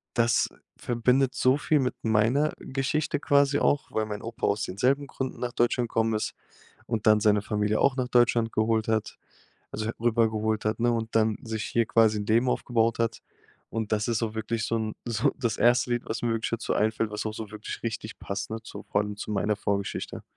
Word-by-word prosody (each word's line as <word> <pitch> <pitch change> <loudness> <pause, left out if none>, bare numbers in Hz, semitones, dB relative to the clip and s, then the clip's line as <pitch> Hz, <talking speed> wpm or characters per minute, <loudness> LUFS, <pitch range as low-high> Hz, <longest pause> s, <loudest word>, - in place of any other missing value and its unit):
das 115 -1 +3 0.3
verbindet 125 +2 +1
so 130 +2 +3
viel 150 0 +2
mit 125 -2 0
meiner 115 +7 +2
Geschichte 140 +3 -1
quasi 145 -1 +3
auch, 145 - +1
weil 110 - 0
mein 105 -1 -5
Opa 115 +2 -3
aus 100 0 0
denselben 130 +9 0
Gründen 130 -1 -5
nach 120 -1 -3
Deutschland 120 0 +1
gekommen 115 -1 +1
ist 110 - -2 0.5
und 115 -3 -3
dann 110 -1 +6
seine 105 -1 +4
Familie 105 +1 0
auch 140 -1 +3
nach 130 -2 -1
Deutschland 120 -2 +3
geholt 110 0 +1
hat, 110 -1 -1 0.6
also, 110 - -3
he - - 0
rüber 115 -1 +3
geholt 110 0 -1
hat, 110 +2 0
ne, 120 +1 +3
und 115 -1 -3
dann 110 -1 +3
sich 110 -1 -3
hier 115 -1 +1
quasi 110 -2 +3
'n 105 - -4
Leben 115 +3 +3
aufgebaut 115 -2 +1
hat. 115 0 -1 0.5
Und 110 -1 -3
das 105 -1 +1
ist 115 -1 0
auch 110 -1 -2
wirklich 110 0 -2
so 115 - -1
'n 110 -1 -2
so 115 -2 +1
das 120 -4 -1
erste 120 +2 +3
Lied, 120 0 0
was 110 - -4
mir 120 - +1
wirklich 115 0 -2
dazu 115 0 -1
einfällt, 110 0 +1
was 105 +1 -4
auch 110 - -2
so 110 -1 -6
wirklich 110 0 -7
richtig 110 -1 -5
passt, 100 -1 -4
ne, 110 0 -4
zu 110 - -9
vor 100 - 0
allem 105 -1 -5
zu 105 - -5
meiner 105 +1 +1
Vorgeschichte. 100 -1 -3
115 Hz, 210 wpm, -27 LUFS, 110-120 Hz, 0.6 s, dann